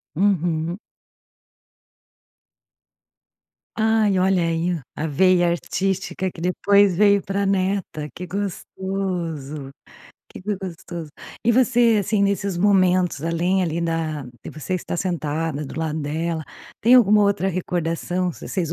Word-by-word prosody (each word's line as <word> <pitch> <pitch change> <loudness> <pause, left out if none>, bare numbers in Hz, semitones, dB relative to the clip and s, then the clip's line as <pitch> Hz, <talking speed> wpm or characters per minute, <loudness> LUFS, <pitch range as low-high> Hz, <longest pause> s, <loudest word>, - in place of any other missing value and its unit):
Uhum. 175 -2 0 3.0
Ai, 220 -3 +3
olha 185 -1 +2
aí, 165 +1 0 0.2
a 160 - -2
veia 175 +4 +3
artística 190 +2 -2
que 165 - -11
depois 200 +1 +3
veio 200 -1 +5
pra 200 +1 -2
neta, 190 -5 -1
que 180 - -7
gostoso, 180 -7 -4 0.6
que - - -11
gostoso. 180 -5 -5 0.3
E 235 - +4
você, 240 -2 +4
assim, 205 +1 0
nesses 200 -2 0
momentos, 185 -5 +3
além, 170 +3 +1
ali, 170 -1 -1
da 165 -3 -2 0.2
de - - -7
você 155 +5 -4
estar 175 - -3
sentada 160 -4 -2
do 140 - -7
lado 160 -1 -2
dela, 160 +2 -2 0.4
tem 235 +4 +6
alguma 210 -4 +6
outra 200 -2 +1
recordação, 180 0 -2
v - - -10
vocês 170 -4 -2
180 Hz, 120 wpm, -22 LUFS, 165-195 Hz, 3.0 s, tem